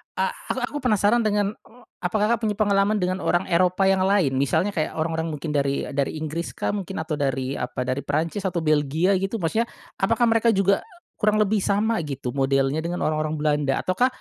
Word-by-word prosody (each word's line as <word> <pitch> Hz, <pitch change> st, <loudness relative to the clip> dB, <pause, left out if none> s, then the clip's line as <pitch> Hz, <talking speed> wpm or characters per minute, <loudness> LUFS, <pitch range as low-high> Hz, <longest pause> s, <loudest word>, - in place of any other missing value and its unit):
a -, -, 0 dB, 0.2 s
aku -, -, -2 dB
aku 290 Hz, -, -3 dB
penasaran 220 Hz, -3 st, +3 dB
dengan, 205 Hz, -3 st, +1 dB
eee, 235 Hz, +3 st, -20 dB, 0.2 s
apa 180 Hz, +3 st, -3 dB
Kakak 230 Hz, +2 st, +2 dB
punya 215 Hz, -2 st, -1 dB
pengalaman 200 Hz, 0 st, +2 dB
dengan 185 Hz, -2 st, -1 dB
orang 175 Hz, -1 st, +1 dB
Eropa 180 Hz, +2 st, +3 dB
yang 190 Hz, 0 st, +3 dB
lain, 195 Hz, -8 st, +3 dB
misalnya 160 Hz, +8 st, +1 dB
kayak 160 Hz, -6 st, -2 dB
orang-orang 160 Hz, 0 st, -1 dB
mungkin 155 Hz, 0 st, -4 dB
dari 140 Hz, -1 st, 0 dB
dari 140 Hz, +1 st, -1 dB
Inggris 160 Hz, +2 st, -4 dB
kah -, -, -1 dB
mungkin 195 Hz, -5 st, -4 dB
atau 155 Hz, -2 st, -4 dB
dari 135 Hz, -1 st, -1 dB
apa 125 Hz, +1 st, -3 dB
dari 130 Hz, +2 st, -2 dB
Prancis 160 Hz, +8 st, -1 dB
atau 175 Hz, -3 st, -2 dB
Belgia 155 Hz, +4 st, +2 dB
gitu? 195 Hz, +3 st, -2 dB
Maksudnya, 220 Hz, +8 st, +1 dB, 0.3 s
apakah 230 Hz, +4 st, +2 dB
mereka 230 Hz, 0 st, +3 dB
juga 195 Hz, 0 st, +3 dB, 0.4 s
kurang 210 Hz, 0 st, +3 dB
lebih 215 Hz, 0 st, +2 dB
sama 210 Hz, +4 st, +1 dB
gitu 135 Hz, -3 st, -4 dB
modelnya 135 Hz, +2 st, +1 dB
dengan 170 Hz, +2 st, -3 dB
orang-orang 155 Hz, 0 st, 0 dB
Belanda? 150 Hz, -2 st, +1 dB
Ataukah 185 Hz, +7 st, +2 dB
175 Hz, 190 wpm, -24 LUFS, 150-205 Hz, 0.4 s, penasaran